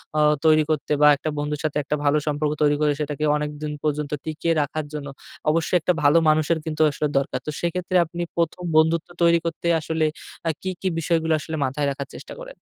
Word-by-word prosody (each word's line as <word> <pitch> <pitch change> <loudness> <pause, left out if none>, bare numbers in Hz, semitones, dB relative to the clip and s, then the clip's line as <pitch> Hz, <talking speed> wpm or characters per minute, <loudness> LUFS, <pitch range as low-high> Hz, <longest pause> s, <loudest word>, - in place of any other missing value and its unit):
অ্যা 150 - +3 0.2
তৈরি 155 -1 +6
করতে 155 -2 -1
বা 150 - +8
একটা 155 - -3
বন্ধুর 150 0 -2
সাথে 155 -1 -1
একটা 145 - -1
ভালো 145 +1 +3
সম্পর্ক 150 0 0
তৈরি 145 0 +4
করে 150 -1 +3
সেটাকে 150 0 -3
অনেকদিন 150 0 -4
পর্যন্ত 150 -1 -1
টিকিয়ে 160 +1 -1
রাখার 150 +1 -3
জন্য 145 -1 -5 0.4
অবশ্যই 165 +3 +2
একটা 180 - +2
ভালো 145 +3 +5
মানুষের 155 +2 +2
কিন্তু 155 -1 -2
আসলে 150 - -1
দরকার। 135 -1 -1
তো - - -1
সেক্ষেত্রে 180 +2 -2
আপনি 170 +2 -6 0.2
১ম 170 +2 -1
বন্ধুত্ব 160 +1 +3
তৈরি 170 0 +5
করতে 170 +1 -3
আসলে 160 0 -1 0.4
অ্যা 165 - +1
কি, 190 - -3
কি 190 - -1
বিষয়গুলো 160 0 +1
আসলে 160 +1 -5
মাথায় 140 +2 -1
রাখার 140 0 -5
চেষ্টা - - -9
করেন? - - -9
155 Hz, 200 wpm, -23 LUFS, 150-165 Hz, 0.4 s, বা